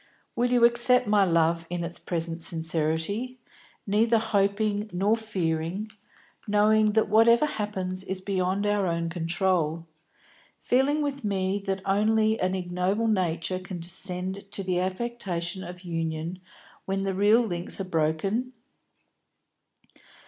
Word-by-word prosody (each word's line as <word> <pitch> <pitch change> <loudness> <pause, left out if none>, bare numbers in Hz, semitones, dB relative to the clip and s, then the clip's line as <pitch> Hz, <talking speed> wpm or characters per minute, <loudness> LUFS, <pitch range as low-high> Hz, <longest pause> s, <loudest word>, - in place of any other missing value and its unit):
Will 245 +1 +1
you 240 -1 +5
accept 240 +1 +4
my 205 -2 +3
love 165 -1 +1
in 175 -1 -3
its 170 0 -5
present 165 -1 -3
sincerity, 165 +9 -1 0.5
neither 225 +3 +3
hoping 210 -1 0
nor 195 +5 +2
fearing, 190 -2 -2 0.6
knowing 210 +1 +3
that 220 0 +2
whatever 230 +5 +5
happens 190 -7 -4
is 190 0 -3
beyond 190 +1 -1
our 205 -2 +1
own 170 0 -1
control, 170 -1 0 0.7
feeling 280 +4 +1
with 280 -2 -3
me 195 -1 -1
that 190 0 -2
only 215 +2 +2
an 185 +1 0
ignoble 180 +4 -1
nature 185 -3 0
can 185 -2 -7
descend 185 +2 -1
to 195 - -1
the 180 -1 0
affectation 185 -2 -3
of 180 0 -9
union 165 0 -4 0.5
when 195 0 -2
the 195 -1 -1
real 205 +5 +4
links 175 -3 0
are - - -1
broken?" 185 +9 -1
190 Hz, 125 wpm, -26 LUFS, 175-215 Hz, 0.7 s, you